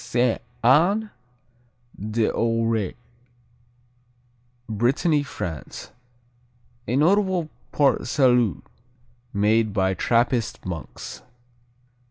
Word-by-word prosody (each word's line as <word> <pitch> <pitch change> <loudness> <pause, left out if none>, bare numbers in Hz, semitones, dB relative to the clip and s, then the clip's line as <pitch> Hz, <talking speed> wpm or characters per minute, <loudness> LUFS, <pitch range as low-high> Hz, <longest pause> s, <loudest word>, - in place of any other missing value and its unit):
Sainte 120 -1 +1 0.2
Anne 185 - +4 0.8
d'Auray 115 0 0 1.7
Brittany, 135 - +1
France 85 - -7 1.0
A 125 - 0
notable 180 +1 +2 0.2
Port 140 -4 +2
Salut 120 - +2 0.7
made 105 +1 +2
by 95 -2 +1
Trappist 120 +4 0
monks. 85 -4 -7
115 Hz, 65 wpm, -24 LUFS, 105-145 Hz, 1.7 s, Anne